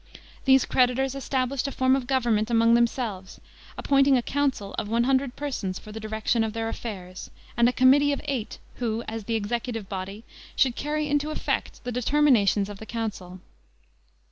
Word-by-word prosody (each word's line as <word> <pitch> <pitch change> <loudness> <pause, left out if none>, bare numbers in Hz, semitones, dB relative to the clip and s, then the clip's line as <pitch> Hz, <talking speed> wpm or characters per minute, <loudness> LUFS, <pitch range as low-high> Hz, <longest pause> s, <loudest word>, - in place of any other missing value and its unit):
These 265 -1 +5
creditors 255 +1 +2
established 270 0 -1
a - - -3
form 260 0 +2
of 265 -3 -3
government 235 -5 +1
among 230 0 +4
themselves, 235 -5 -1 0.4
appointing 275 -1 +4
a 245 - -1
council 265 -8 -1
of 205 - -4
one 230 +1 +2
hundred 265 0 +1
persons 235 -10 -3
for 215 - -11
the 220 - -7
direction 220 +1 0
of 220 -1 -3
their 225 0 -2
affairs, 185 -6 -7 0.3
and 235 +1 +4
a - - 0
committee 270 +3 +5
of 285 - -1
eight, 265 -7 -3 0.2
who, 230 -1 -2
as 220 -1 -5
the 230 - -1
executive 225 0 -3
body, 195 +2 -6 0.3
should 255 -3 +2
carry 300 +1 -2
into 290 +1 0
effect 310 - -3
the 245 - -4
determinations 245 -6 +3
of 205 -1 -9
the 220 - -10
council. 200 -6 -5
235 Hz, 170 wpm, -25 LUFS, 215-270 Hz, 0.4 s, These